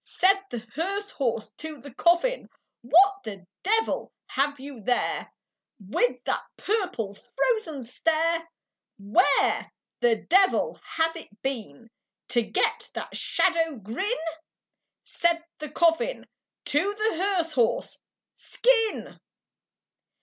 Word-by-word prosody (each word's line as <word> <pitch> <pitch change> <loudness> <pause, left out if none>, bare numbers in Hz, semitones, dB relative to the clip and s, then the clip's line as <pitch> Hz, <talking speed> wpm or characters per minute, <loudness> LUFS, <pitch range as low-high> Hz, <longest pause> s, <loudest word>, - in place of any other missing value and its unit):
Said 390 +1 +3
the 240 -1 -6
hearse 395 +5 -2
horse 230 -5 -2
to 315 -1 -7
the 270 0 -11
coffin, 345 - +2 0.3
"What 370 +11 +5
the 195 -3 -8 0.2
devil 450 +3 +1 0.2
have 285 +1 0
you 270 -3 -9
there, 245 +4 0 0.5
With 245 +5 0
that - - -1
purple 365 - -1
frozen 330 - -1
stare? 330 +6 0 0.5
Where 205 - +3 0.3
the 240 -2 +4
devil 380 - +2
has 325 0 -1
it 215 -11 -11
been 230 - -5 0.4
To 240 -1 +3
get 220 - 0
that - - -5
shadow 330 -4 +1
grin?" 230 - -3 0.9
Said 340 -1 +1 0.2
the 305 -1 -5
coffin 340 - +1 0.4
to 380 +8 +1
the 430 -4 0
hearse 365 -5 +1
horse, 240 -6 +1 0.4
"Skin!" 460 -3 +1
320 Hz, 110 wpm, -26 LUFS, 245-385 Hz, 0.9 s, What